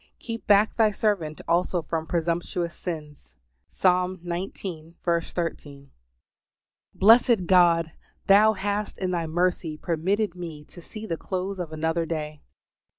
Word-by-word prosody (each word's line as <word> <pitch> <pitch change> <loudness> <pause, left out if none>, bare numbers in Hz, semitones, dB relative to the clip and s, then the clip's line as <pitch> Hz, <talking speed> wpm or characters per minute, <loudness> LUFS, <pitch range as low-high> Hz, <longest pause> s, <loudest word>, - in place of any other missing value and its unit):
"Keep 230 -1 -7
back 205 +1 +4
Thy 220 -2 +5
servant 195 -7 -1
also 175 0 +1
from 160 +1 -3
presumptuous 170 0 -1
sins." 150 - -7 0.3
Psalm 185 - +1
xix. 170 -2 -5 0.4
13. 145 -5 -5 1.0
Blessed 225 -1 +5
God, 170 -3 +4 0.3
Thou 210 +2 +6
hast 205 +1 -3
in 185 -1 -2
Thy 170 -2 -1
mercy 170 -1 -1
permitted 185 +5 -1
me 165 -4 -8
to 175 - -13
see 215 +5 -9
the 165 -6 -3
close 190 +2 -4
of 170 -3 -4
another 160 +1 -1
day. 155 -2 -4
175 Hz, 125 wpm, -25 LUFS, 160-195 Hz, 1.0 s, Thou